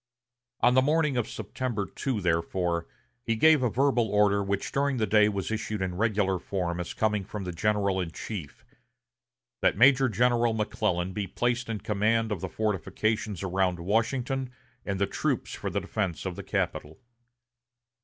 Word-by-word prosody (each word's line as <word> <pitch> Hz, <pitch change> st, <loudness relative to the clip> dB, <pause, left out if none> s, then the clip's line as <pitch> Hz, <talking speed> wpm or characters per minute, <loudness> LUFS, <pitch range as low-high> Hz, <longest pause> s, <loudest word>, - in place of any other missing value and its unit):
On 120 Hz, -, +5 dB
the 130 Hz, -, +5 dB
morning 150 Hz, 0 st, +2 dB
of 120 Hz, -2 st, -1 dB
September 120 Hz, -6 st, -3 dB
2, 125 Hz, -2 st, -3 dB
therefore, 85 Hz, 0 st, 0 dB, 0.3 s
he 115 Hz, -1 st, -1 dB
gave 155 Hz, +5 st, +5 dB
a 125 Hz, -, +2 dB
verbal 125 Hz, -2 st, +2 dB
order, 100 Hz, -1 st, +3 dB
which 100 Hz, 0 st, -2 dB
during 140 Hz, -1 st, +1 dB
the 110 Hz, -, +1 dB
day 105 Hz, +1 st, +4 dB
was 100 Hz, -1 st, -3 dB
issued 110 Hz, -1 st, -2 dB
in 95 Hz, -1 st, -2 dB
regular 100 Hz, -2 st, +1 dB
form 90 Hz, -2 st, -3 dB
as 90 Hz, -, -5 dB
coming 105 Hz, -2 st, +1 dB
from 100 Hz, +1 st, -6 dB
the 90 Hz, -, -4 dB
general 100 Hz, 0 st, +1 dB
in 85 Hz, -, -3 dB
chief, 85 Hz, -2 st, -7 dB, 1.0 s
that -, -, +3 dB
Major 130 Hz, +2 st, +6 dB
General 120 Hz, +1 st, +2 dB
McClellan 100 Hz, -4 st, -1 dB
be 100 Hz, 0 st, -3 dB
placed 120 Hz, +5 st, -1 dB
in 105 Hz, -3 st, -3 dB
command 110 Hz, +2 st, +1 dB
of 100 Hz, -5 st, -2 dB
the 95 Hz, -, -3 dB
fortifications 110 Hz, 0 st, -1 dB
around 95 Hz, -1 st, 0 dB
Washington 125 Hz, +7 st, 0 dB, 0.4 s
and 100 Hz, -2 st, -2 dB
the 100 Hz, -, +3 dB
troops -, -, -2 dB
for -, -, -4 dB
the -, -, -1 dB
defense 95 Hz, -6 st, -3 dB
of 95 Hz, -2 st, -3 dB
the -, -, -6 dB
capital. 75 Hz, +2 st, -3 dB
105 Hz, 165 wpm, -28 LUFS, 95-120 Hz, 1.0 s, Major